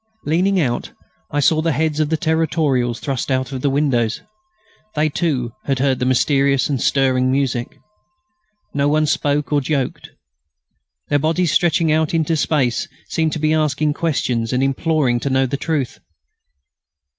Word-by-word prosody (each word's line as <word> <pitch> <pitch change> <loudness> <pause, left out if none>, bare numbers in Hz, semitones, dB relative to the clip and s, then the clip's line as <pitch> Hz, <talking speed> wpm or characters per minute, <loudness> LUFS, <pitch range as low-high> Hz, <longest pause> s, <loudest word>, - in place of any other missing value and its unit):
Leaning 185 +5 +2
out, 125 -7 -2 0.4
I 145 - -1
saw 155 +2 +3
the 165 -1 0
heads 155 0 0
of 155 -1 +1
the 160 - +1
Territorials 155 -7 0
thrust 135 -2 -3
out 130 0 -1
of 130 -2 -4
the 140 - +1
windows. 135 -6 0 0.7
They, 155 +1 +2
too, 140 -7 -1
had 135 -1 0
heard 130 -1 +1
the 125 - 0
mysterious 135 +1 +2
and 135 -4 -1
stirring 130 -2 +2
music. 130 -3 -1 1.0
No 140 0 +1
one 155 +1 +2
spoke 150 -1 0
or 145 - +3
joked. 135 -1 -2 1.0
Their 145 - +2
bodies, 160 +2 +1
stretching 165 -2 +2
out 160 +1 +1
into 160 0 +1
space, 140 -5 0 0.2
seemed 160 -1 0
to - - -2
be 155 +1 +1
asking 150 -1 +1
questions 125 -8 -1
and 130 +1 +1
imploring 135 -2 +1
to 140 - -2
know 135 0 +2
the 135 +2 -2
truth. 140 -3 -2
145 Hz, 155 wpm, -19 LUFS, 130-155 Hz, 1.0 s, saw